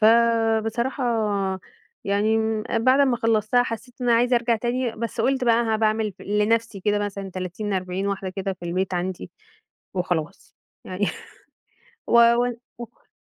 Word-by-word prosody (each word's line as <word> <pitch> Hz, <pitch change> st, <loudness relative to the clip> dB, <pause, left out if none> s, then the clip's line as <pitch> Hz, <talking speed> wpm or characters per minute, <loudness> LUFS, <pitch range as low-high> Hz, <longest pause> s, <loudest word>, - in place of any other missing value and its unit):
فبصراحة 230 Hz, +2 st, +2 dB, 1.0 s
يعني 205 Hz, +2 st, +2 dB
امم 220 Hz, -1 st, -1 dB, 0.2 s
بعد 260 Hz, +2 st, +5 dB
ما 265 Hz, -3 st, +3 dB
خلّصتها 225 Hz, +1 st, +2 dB
حسيت 230 Hz, +1 st, -6 dB
إن 245 Hz, -, -1 dB
أنا 235 Hz, -, +5 dB
عايزة 245 Hz, +1 st, +3 dB
أرجع 235 Hz, -1 st, +1 dB
تاني، 240 Hz, +1 st, -1 dB
بس 230 Hz, 0 st, -3 dB
قُلت 265 Hz, +2 st, +1 dB
بقى 235 Hz, 0 st, +4 dB
ها 220 Hz, -1 st, +1 dB
باعمل 215 Hz, -1 st, +1 dB
لنَفسي 210 Hz, +1 st, 0 dB
كده 205 Hz, +2 st, +1 dB
مثلًا 200 Hz, -1 st, -4 dB
30، 185 Hz, +3 st, -4 dB
40 185 Hz, +1 st, -2 dB
واحدة 195 Hz, -1 st, -2 dB
كده 195 Hz, +1 st, -3 dB
في 180 Hz, -2 st, -11 dB
البيت 185 Hz, +2 st, -1 dB
عندي 180 Hz, +1 st, -3 dB, 0.6 s
وخلاص، 175 Hz, -3 st, -3 dB, 0.3 s
يعني 185 Hz, +2 st, -2 dB, 1.0 s
و -, -, -2 dB
و 235 Hz, +1 st, +4 dB, 0.2 s
وكل 240 Hz, 0 st, -12 dB
220 Hz, 145 wpm, -24 LUFS, 195-235 Hz, 1.0 s, بعد